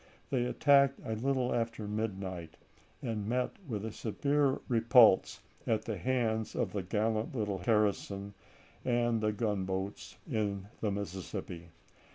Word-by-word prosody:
They 125 -3 +1
attacked 140 +1 +4
a 110 - -2
little 125 +2 0
after 115 -2 -2
midnight, 95 -5 -4 0.5
and 110 -3 -2
met 125 +1 0 0.2
with 110 -4 -3
a 110 - -4
severe 140 +6 +1
repulse 115 -3 +5 0.3
at 110 -1 +1
the 110 -4 -3
hands 110 0 0
of - - -1
the 100 - -1
gallant 110 +5 -1
little 105 -4 -1
garrison 100 -1 0 0.5
and 120 -2 +1
the 105 0 +2
gunboats 100 -2 -3
in 100 -6 -2
the 110 - 0
Mississippi. 95 -3 -5
110 Hz, 130 wpm, -32 LUFS, 100-120 Hz, 0.5 s, repulse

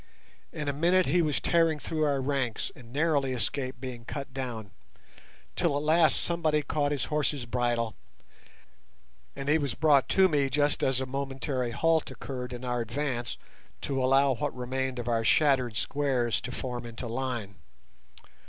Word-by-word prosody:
In 150 - -5
a 140 - +1
minute 175 +5 +3
he 175 +6 +3
was 150 -3 +1
tearing 165 -2 +3
through 155 +1 -1
our 140 -2 +1
ranks 130 -5 -1
and 120 -2 -14
narrowly 145 -2 +1
escaped 130 +3 -2
being 125 -2 -6
cut 140 +2 -6
down, 120 -6 -5 0.8
till 165 -5 +1
at 145 - -2
last 160 0 +4
somebody 160 -3 +1
caught 145 0 0
his 145 - -1
horse's 150 -4 -1
bridle, 120 -2 0 1.4
and 140 0 -6
he 155 +2 +4
was 140 -5 -2
brought 145 -4 +4
to 190 -1 +5
me 145 -5 +1
just 145 +2 +1
as 130 -1 +1
a - - -1
momentary 135 -1 -2
halt 160 +6 +1
occurred 125 -2 -6
in 125 +1 -6
our 120 -1 -1
advance 120 0 -2 0.4
to 135 -2 -1
allow 135 +1 +4
what 145 +3 -3
remained 130 +1 -2
of 120 -1 -4
our 115 -1 +1
shattered 130 -4 +3
squares 130 -5 0
to 125 - -5
form 125 -1 -4
into 115 +1 -7
line. 120 -4 -3
135 Hz, 160 wpm, -29 LUFS, 125-150 Hz, 1.4 s, to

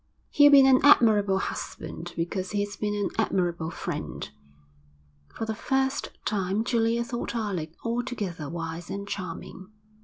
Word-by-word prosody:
'He'll 290 0 +7
be 275 -1 +8
an 260 -1 +6
admirable 210 -8 +5
husband 170 -2 -5
because 185 +2 -2
he's 205 0 -1
been 210 0 -2
an 205 -1 -1
admirable 175 -6 0
friend.' 165 - -5 1.0
For 225 - -3
the 220 - -2
first 265 +4 -1 0.2
time 200 0 0
Julia 230 0 +1
thought 240 0 -4
Alec 185 -8 -3
altogether 230 - -3
wise 165 0 -5
and 200 +1 -5
charming. 185 0 -6
205 Hz, 130 wpm, -27 LUFS, 175-235 Hz, 1.0 s, be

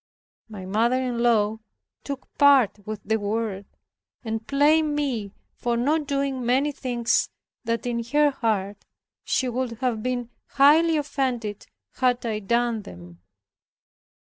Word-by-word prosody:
My 200 -4 -8
mother 230 +6 +1
in 250 -2 -2
law 220 -2 +2 0.4
took 280 -2 -6
part 260 -8 +4
with 215 -1 -5
the 220 +1 +1
world, 205 -1 -2 0.6
and 220 -1 -3
blamed 300 +2 +3
me 245 -9 -2 0.2
for 240 -1 -2
not 295 +5 +1
doing 275 -2 -1
many 265 +5 +2
things 240 -4 0 0.4
that 230 +1 -1
in 235 -1 -1
her 295 +4 +3
heart 210 -6 -2 0.4
she 260 - 0
would 250 0 -2
have 235 -2 -2
been 245 0 -3 0.2
highly 315 +4 +5
offended 255 -8 -2 0.3
had 250 -1 +1
I 220 -2 -1
done 235 +2 0
them. 90 - -13
240 Hz, 130 wpm, -24 LUFS, 220-275 Hz, 0.6 s, highly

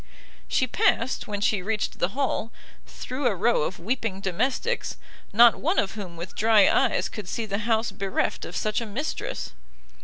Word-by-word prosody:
She 255 - +2
passed, 245 0 +1
when 205 -1 -4
she 210 -2 +2
reached 215 +2 -2
the 190 +9 -1
hall, 260 -4 -1 0.4
through 255 +1 -3
a 220 - +1
row 225 +3 +2
of 175 +4 -2
weeping 220 0 -2
domestics, 255 - -1 0.3
not 235 +2 +7
one 335 +6 0
of 195 - +2
whom 185 -6 -8
with 175 +3 -7
dry 215 -2 +5
eyes 265 -3 +2
could 205 -4 -8
see 230 - -2
the 200 -1 -2
house 225 0 +2
bereft 195 -1 -2
of 175 - -6
such 215 +2 0
a 230 - -4
mistress. 260 +9 -4
220 Hz, 175 wpm, -26 LUFS, 195-240 Hz, 0.4 s, not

